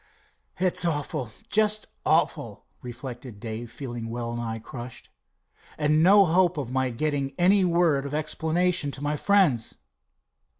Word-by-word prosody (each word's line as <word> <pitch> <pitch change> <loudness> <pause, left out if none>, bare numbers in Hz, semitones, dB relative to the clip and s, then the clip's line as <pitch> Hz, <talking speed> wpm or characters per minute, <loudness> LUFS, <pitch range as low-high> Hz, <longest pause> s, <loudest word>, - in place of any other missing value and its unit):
"It's 180 -1 +2
awful, 145 -7 -2 0.2
just 215 0 +2 0.2
awful," - - 0 0.2
reflected 120 -2 -8
Dave, 115 +1 -6
feeling 120 -2 -6
well 120 0 -4
nigh 115 -1 -3
crushed, 120 +2 -9 0.7
"and 150 +1 +2
no 195 +3 +7
hope 175 0 +2
of 130 -4 -4
my 130 0 0
getting 140 +2 -2
any 190 +3 +4
word 170 -6 +2
of 140 - -8
explanation 160 +1 0
to 140 - -4
my 145 +1 0
friends." 155 - +2
145 Hz, 130 wpm, -26 LUFS, 120-175 Hz, 0.7 s, no